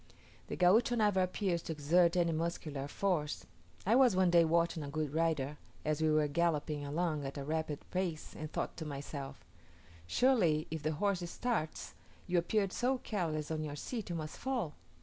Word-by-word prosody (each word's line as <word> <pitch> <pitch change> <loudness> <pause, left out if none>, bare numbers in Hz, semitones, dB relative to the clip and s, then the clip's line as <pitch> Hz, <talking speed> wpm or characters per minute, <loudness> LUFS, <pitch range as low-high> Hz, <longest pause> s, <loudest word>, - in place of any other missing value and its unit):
The - - -4
Gaucho 210 +7 +4
never 205 -4 +3
appears 185 -1 0
to 160 - -4
exert 170 +4 +3
any 170 -1 +3
muscular 155 -4 -3
force. 155 -2 -1 0.4
I 210 - +3
was 250 -5 +6
one 185 -1 +4
day 170 -1 +7
watching 165 0 +2
a 145 - -5
good 150 -1 -2
rider, 155 -3 0 0.3
as 155 0 0
we 160 - +3
were 155 -1 +3
galloping 150 -1 0
along 155 +1 -1
at 135 +1 -5
a 140 - -3
rapid 155 0 -3
pace, 180 -4 -2
and 155 -1 -6
thought - - -3
to 160 - -4
myself, 140 -1 -6 0.6
"Surely 170 - +3
if 160 -1 -3
the 155 +1 0
horse 180 +1 0
starts, 220 -8 -2 0.3
you 180 -1 +2
appear 200 +4 +1
so 255 +5 +1
careless 160 -10 -2
on 155 -1 -1
your 145 -1 -4
seat, 220 - -5
you 175 - -2
must 155 -1 -5
fall." 245 - -2
165 Hz, 180 wpm, -34 LUFS, 150-185 Hz, 0.6 s, day